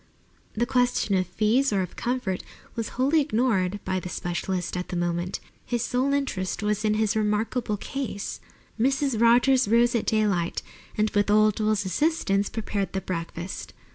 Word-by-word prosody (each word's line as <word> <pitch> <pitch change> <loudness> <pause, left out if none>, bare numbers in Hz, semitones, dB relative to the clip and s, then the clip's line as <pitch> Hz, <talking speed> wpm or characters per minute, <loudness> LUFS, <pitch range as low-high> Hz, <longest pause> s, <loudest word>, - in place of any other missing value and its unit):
The 235 +2 +1
question 245 -4 +1
of 185 -2 +2
fees 225 +9 +2
or 195 -2 +2
of 180 - -8
comfort 240 -7 -2 0.3
was 230 -2 -3
wholly 280 +5 +3
ignored 215 -8 +1
by 185 0 0
the 180 - -7
specialist 175 +1 -3
at 180 0 -3
the - - -5
moment. 175 +1 -1 0.2
His 240 -1 -1
sole 255 +3 0
interest 220 -10 -1
was 210 0 0
in 215 -1 +2
his 215 -1 +1
remarkable 215 +1 0
case. 255 -3 -4 0.4
Mrs. 270 -1 +1
Rogers 245 +2 +5
rose 235 +2 +4
at 235 - 0
daylight 200 -6 +1 0.3
and 215 0 +2
with 205 0 +1
old 215 0 +4
Will's 215 -2 +1
assistance 200 - +1
prepared 205 -3 -3
the 190 - -1
breakfast. 170 0 -5
215 Hz, 160 wpm, -26 LUFS, 190-245 Hz, 0.4 s, Rogers